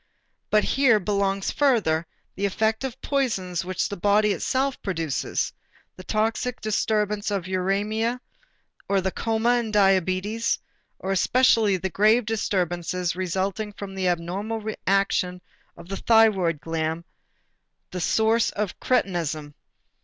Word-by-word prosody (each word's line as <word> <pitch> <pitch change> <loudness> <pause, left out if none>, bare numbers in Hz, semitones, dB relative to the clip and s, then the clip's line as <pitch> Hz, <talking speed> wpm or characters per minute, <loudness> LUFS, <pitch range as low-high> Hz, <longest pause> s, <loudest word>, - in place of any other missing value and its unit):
But 215 0 +4
here 265 -6 +3
belongs 195 0 0
further 190 - +2 0.3
the 200 +1 -1
effect 220 +4 0
of 260 -1 -5
poisons 195 - -1
which 185 0 -1
the 200 - -5
body 205 +2 +3
itself 260 - -1
produces: 165 -7 -2 0.4
the 185 - -11
toxic 225 +4 -1
disturbance 210 -1 0
of 200 -3 -1
uræmia 205 +6 -1 0.7
or 200 -1 +3
the 190 0 -1
coma 230 +4 +1
in 230 -2 -3
diabetes, 195 +2 +2 0.4
or 190 - -4
especially 220 0 +3
the 190 +1 -4
grave 215 +5 +4
disturbances 180 -5 -1
resulting 190 +3 -2
from 200 -1 -8
the 190 -1 -1
abnormal 200 +6 -2
action 190 -2 +1 0.4
of 170 0 -12
the 195 +1 -4
thyroid 205 -8 +3
gland, 165 0 -2 0.9
the 180 - -4
source 220 +5 +2
of 205 -2 -4
cretinism. 165 - -1
200 Hz, 125 wpm, -24 LUFS, 180-220 Hz, 0.9 s, But